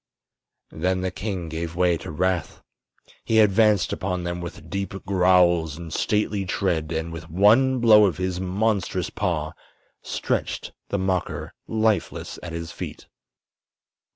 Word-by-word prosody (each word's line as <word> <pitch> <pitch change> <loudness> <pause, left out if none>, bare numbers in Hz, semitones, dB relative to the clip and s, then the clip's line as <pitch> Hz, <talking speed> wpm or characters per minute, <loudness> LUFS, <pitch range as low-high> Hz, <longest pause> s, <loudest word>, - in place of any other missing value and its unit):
Then 90 +3 -1
the 95 0 -1
king 95 -5 -4
gave 80 +1 -4
way 90 -1 +3
to 70 - -9
wrath. 90 +3 -1 0.6
He 110 - +1
advanced 105 -1 +4
upon 90 -2 -2
them 85 0 -3
with 85 -2 -8
deep 95 +2 -4
growls 90 -4 +3
and 85 -2 -8
stately 105 -1 0
tread 85 -4 -1
and 80 0 -3
with 80 0 -8
one 110 +10 +4
blow 110 -3 +7
of 90 - -2
his 90 -1 -2
monstrous 100 +2 -1
paw - - -1 0.5
stretched - - -2 0.2
the 100 - 0
mocker 95 -2 -2
lifeless 110 -1 -1
at 85 - -7
his 85 0 -5
feet. - - -7
90 Hz, 135 wpm, -24 LUFS, 85-100 Hz, 0.6 s, blow